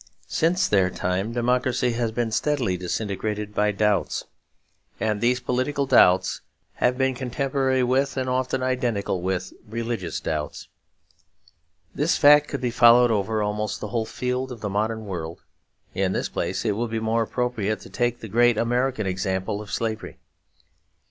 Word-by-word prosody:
Since 180 +3 +1
their 95 -3 +3
time 90 +4 -2
democracy 125 +1 +1
has 115 -1 -1
been 115 0 -1
steadily 125 -5 0
disintegrated 105 +3 -3
by 105 0 +2
doubts; 105 -1 0 0.8
and 105 -1 -1
these 125 +1 +2
political 130 +3 -1
doubts 90 -7 +4 0.4
have 125 +1 +2
been 130 0 +2
contemporary 130 +1 0
with 135 +2 +1
and 130 -1 -1
often 130 0 -1
identical 120 -8 -1
with 95 0 -2 0.2
religious 115 -6 -3
doubts. 75 -1 -4 1.3
This 150 +4 +1
fact 150 0 +7
could 140 - -4
be 125 -2 0
followed 120 0 +6
over 105 +1 0
almost 105 0 -2
the 105 - -5
whole 115 -1 -1
field 125 +1 -3
of 120 -4 -8
the 105 - -2
modern 110 +2 -1
world; 85 -4 -6 0.5
in 95 -1 0
this - - -2
place - - -3
it 110 - +2
will 115 +4 -1
be 115 0 -2
more 110 +1 +1
appropriate 115 -2 -1
to - - -12
take 120 0 -1
the 110 - -6
great 120 +2 +3
American 120 0 0
example 95 +1 -2
of 105 - -10
slavery. 110 -1 -3
115 Hz, 155 wpm, -24 LUFS, 105-125 Hz, 1.3 s, fact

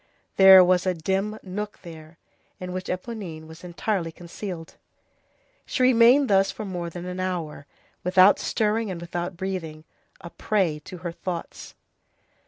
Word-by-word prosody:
There 190 -1 +9
was 180 +1 +2
a 185 - +1
dim 195 +6 -2
nook 205 +2 -6
there, 160 -1 -12 0.4
in 180 0 -6
which 185 0 -5
Éponine 180 -5 -6
was 160 +2 -13
entirely 175 0 -2
concealed. 170 0 -8 0.9
She 255 - -1
remained 255 +3 +5
thus 195 -2 +3
for 215 - -6
more 175 -3 -4
than 175 +1 -8
an 180 0 -5
hour, 170 -6 -4 0.4
without 185 +2 +5
stirring 220 0 0
and 180 -3 -5
without 175 +1 -5
breathing, 170 -5 -5 0.4
a 170 -3 -10
prey 185 -8 0
to 185 - -9
her 170 - -2
thoughts. 170 0 -7
185 Hz, 145 wpm, -24 LUFS, 170-195 Hz, 0.9 s, There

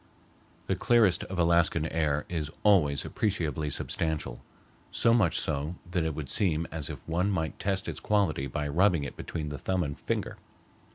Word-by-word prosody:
The - - 0
clearest 115 -7 +3
of 95 - -6
Alaskan 85 -2 +3
air 75 -3 0
is 80 -4 -3
always 75 -10 +4
appreciably 80 -8 -1
substantial, 75 -5 -2 0.5
so 115 - +3
much 110 -8 +3
so 75 +3 -2 0.2
that 90 -2 +1
it 80 -2 -2
would 75 -3 -5
seem 85 0 +1
as 80 -3 -4
if - - -5
one 90 +4 +1
might 80 -5 -2
test 95 -1 -1
its - - -4
quality 95 -10 +1
by 75 +2 -3
rubbing 85 +1 +3
it 70 - -6
between 75 -3 -5
the 75 - -6
thumb 95 -1 0
and 70 -2 -5
finger. - - -2
80 Hz, 170 wpm, -29 LUFS, 75-95 Hz, 0.5 s, always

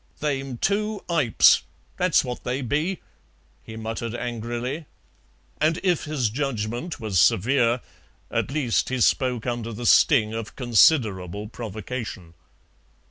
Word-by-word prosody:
"They'm 135 -4 -2
two 210 - -1
ipes, 145 -10 +4 0.3
that's 180 -2 +3
what 125 -2 -6
they 130 +2 -2
be," 155 +9 -1 0.6
he 110 - -10
muttered 115 +1 -4
angrily, 120 +5 -4 0.7
and 160 +3 +2
if 180 -4 +1
his 140 -8 -1
judgment 125 +3 -3
was 105 -6 0
severe, 120 +8 +3 0.5
at - - -1
least 135 -5 0
he 130 0 -2
spoke 125 -1 +1
under 120 -2 -3
the 115 +2 -6
sting 110 -4 +5
of 115 -1 -6
considerable 105 - +2
provocation. 110 -5 -6
120 Hz, 120 wpm, -24 LUFS, 110-145 Hz, 0.7 s, sting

